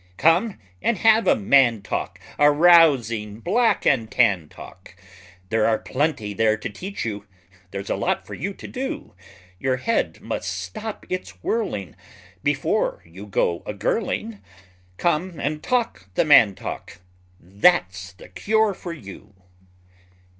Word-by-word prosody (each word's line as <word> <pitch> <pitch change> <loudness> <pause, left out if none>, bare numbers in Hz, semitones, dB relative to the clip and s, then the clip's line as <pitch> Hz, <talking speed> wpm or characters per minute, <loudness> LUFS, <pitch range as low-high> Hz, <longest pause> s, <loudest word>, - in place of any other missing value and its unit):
Come 175 - +3 0.2
and 235 - +1
have 220 +3 +4
a - - +5
man 115 -1 +3
talk, - - -4 0.2
A 145 - +7
rousing 140 - +4
black 225 - +1
and 115 -5 +2
tan 100 -12 +2
talk, 90 0 -13 0.5
There 110 -1 +2
are 110 -1 +2
plenty 130 -7 -2
there 110 +1 +2
to 110 - -5
teach 190 - -6
you; 105 -2 -5 0.4
there's 100 +1 -5
a - - +1
lot - - -1
for - - -9
you 195 +7 -4
to - - -10
do; 265 +1 -5 0.5
Your 130 -1 0
head 230 - -1
must - - -4
stop 220 -1 -6
its 185 0 -6
whirling 105 - -2 0.5
Before - - 0
you 95 +5 -11
go 85 -3 0
a 105 - -4
girling; 210 - -2 0.6
Come 170 0 -1
and 150 +2 -2
talk 235 - -1
the - - +2
man 110 -10 +6
talk; 90 - -7 0.4
that's 95 - +1
the 95 - -14
cure 220 -1 +1
for 175 -2 -7
you! 100 - -12
135 Hz, 140 wpm, -23 LUFS, -, 0.6 s, A